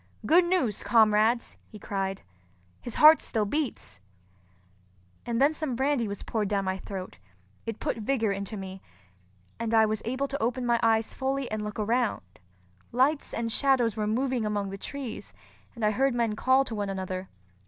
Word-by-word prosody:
"Good 345 +3 +5
news, 345 - 0
comrades!" 225 +1 +3
he 215 - -12
cried. 195 -1 -3 0.6
"His 240 - -6
heart 310 +1 +8
still 215 -2 -1
beats!" 270 - -3 1.3
Then 265 +6 +2
some 305 -5 -3
brandy 265 -2 +1
was 200 -1 -6
poured 215 -3 -1
down 200 -1 0
my 190 0 -2
throat; 185 - -7 0.5
it 225 -1 -4
put - - -2
vigor 225 -1 0
into 200 +2 -4
me, 190 -1 -7 0.8
and 230 0 0
I 220 0 +6
was 215 0 -2
able 260 +4 -2
to 280 +1 -4
open 245 +2 -1
my 235 -1 +2
eyes 225 -1 +2
fully 265 -1 -2
and 215 0 -2
look 210 0 -5
around. 230 - 0 0.7
Lights 270 +5 +1
and 230 0 -2
shadows 250 -4 +2
were 215 -1 -1
moving 250 +2 0
among 205 -2 -2
the 195 - -6
trees, 270 -2 -7 0.4
and 230 -2 -2
I 210 - +3
heard 265 +3 +1
men 230 -3 0
call 260 +4 +3
to 245 - -6
one 205 -2 -2
another. 185 -1 -4
225 Hz, 170 wpm, -27 LUFS, 210-260 Hz, 1.3 s, heart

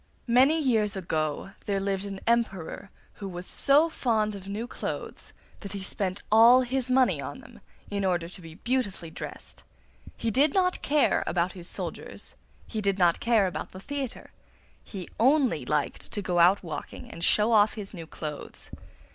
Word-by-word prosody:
Many 270 +6 +5
years 220 -8 +2
ago 160 -1 -2 0.2
there 200 -1 +1
lived 195 0 -1
an 195 -1 -6
Emperor 205 -6 -1 0.3
who 195 - -4
was 175 0 -7
so 290 - +4
fond 220 -9 0
of 195 -1 -9
new 210 +4 -3
clothes - - -6 0.3
that 200 -1 -7
he 200 -1 -5
spent 190 -1 -3
all 230 +4 +8
his 255 0 -1
money 255 0 +3
on - - -6
them - - -15 0.3
in 200 -1 -1
order 175 -3 0
to 180 +1 -9
be 165 -1 -11
beautifully 205 -8 -2
dressed. - - -8 0.6
He 230 - -1
did 280 +6 +3
not 365 -1 +2
care 295 0 +2
about 175 0 0
his 175 -2 -8
soldiers, - - -6 0.3
he 220 - -4
did 200 -1 +1
not 175 -3 +3
care 230 -4 +3
about 185 - -4
the 185 - -8
theatre; 275 +2 -5 0.5
he 190 -4 -7
only 265 +3 +3
liked - - -1
to 205 - -2
go 180 -2 0
out 180 +4 +5
walking 155 -4 -7
to - - -9
show 210 +6 +3
off 215 -1 +5
his 205 -2 -6
new 165 -4 -8
clothes. 150 -2 -8
205 Hz, 170 wpm, -27 LUFS, 185-245 Hz, 0.6 s, all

